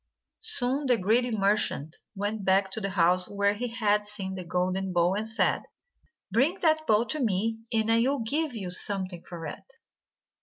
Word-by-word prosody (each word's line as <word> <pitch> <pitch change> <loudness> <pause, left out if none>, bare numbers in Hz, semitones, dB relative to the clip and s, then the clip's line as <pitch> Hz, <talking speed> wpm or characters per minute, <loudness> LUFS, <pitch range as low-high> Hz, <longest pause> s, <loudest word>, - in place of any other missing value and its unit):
Soon 280 - +3
the 245 -2 +4
greedy 225 +6 +2
merchant 200 -7 0 0.2
went 205 +1 -3
back 190 +1 +2
to 220 - -4
the 195 - -2
house 180 -1 +2
where 200 0 +1
he 240 +4 -4
had 210 -3 +1
seen 205 -2 -6
the 185 -1 -6
golden 185 +2 -1
bowl, 175 +1 +2
and 210 +2 -3
said: 225 0 0 0.7
"Bring 275 - +2
that 315 -2 +2
bowl 215 +2 +3
to 310 - -4
me, 225 +1 0
and 225 -1 +1
I 230 - +4
will 270 +4 +1
give 280 +4 -1
you 190 -5 -5
something 185 -2 0
for 170 -2 -8
it." - - -9
210 Hz, 180 wpm, -27 LUFS, 190-240 Hz, 0.7 s, the